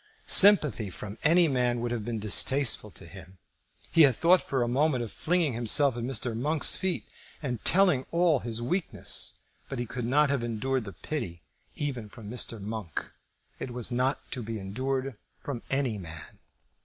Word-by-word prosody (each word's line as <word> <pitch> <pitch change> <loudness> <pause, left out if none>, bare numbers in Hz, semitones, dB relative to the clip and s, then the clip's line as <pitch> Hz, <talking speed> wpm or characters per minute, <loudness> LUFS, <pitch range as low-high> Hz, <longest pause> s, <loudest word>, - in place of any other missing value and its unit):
Sympathy 150 - +5
from 100 +3 -9
any 170 +2 +4
man 125 -3 0
would 120 0 -3
have 120 -3 -3
been 115 +1 -4
distasteful 110 +2 +3
to 95 - -13
him. 90 +1 -13 0.5
He 165 - +4
had 135 -5 +6
thought 175 +6 +4
for 130 -3 -1
a - - -2
moment 130 0 +1
of 110 - -7
flinging 170 -5 0
himself 120 +3 +3
at 120 - -5
Mr. 120 -1 -3
Monk's 150 +6 +2
feet 190 -1 -2 0.3
and 125 -6 -5
telling 180 -8 +3
all 170 -4 +2
his 120 -1 -3
weakness; 175 +8 -1 0.3
but 135 - -5
he 120 - -3
could 120 +1 -5
not 145 +4 +2
have 140 -4 -1
endured 120 -1 -2
pity 90 - -5 0.3
even 125 -7 -4
from 105 -1 -11
Mr. 120 -2 -1
Monk. 105 -5 -6 0.5
It - - -5
was 120 -1 -1
not 130 +3 0
to 125 - -4
be 115 0 -5
endured 130 +5 -4 0.2
from 130 -5 -5
any 135 -6 -1
man. 80 -3 -9
125 Hz, 170 wpm, -28 LUFS, 110-145 Hz, 0.5 s, had